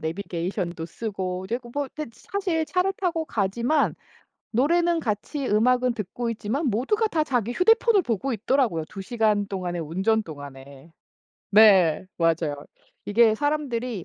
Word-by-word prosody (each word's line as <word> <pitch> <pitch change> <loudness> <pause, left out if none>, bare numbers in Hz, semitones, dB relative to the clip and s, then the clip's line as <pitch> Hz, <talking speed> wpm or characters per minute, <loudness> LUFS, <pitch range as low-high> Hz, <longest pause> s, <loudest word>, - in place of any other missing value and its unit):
내비게이션도 170 0 -4
쓰고 185 -1 -4
이제 230 +5 -2
고 240 -1 -13
뭐 285 0 -2
네 305 - -4
지 230 - -22
사실 365 -5 0
차를 365 +3 0
타고 340 -4 -1
가지만 235 +9 0 0.6
노래는 335 +7 +2
같이 245 +5 -3
음악은 250 +3 +3
듣고 230 +2 -4
있지만 230 +7 -2
모두가 345 - +1
다 320 -7 0
자기 245 -5 0
휴대폰을 440 - +4
보고 245 +3 -2
있더라고요 230 - 0
2 195 - -8
시간 210 -1 +1
동안에 180 -3 -4
운전 190 +8 0
동안에. 140 -1 -11 0.6
네. 195 -6 +6
맞아요. 165 -3 +1 0.5
이게 220 +1 +4
사람들이 250 - -2
225 Hz, 310 characters per minute, -25 LUFS, 185-280 Hz, 0.6 s, 네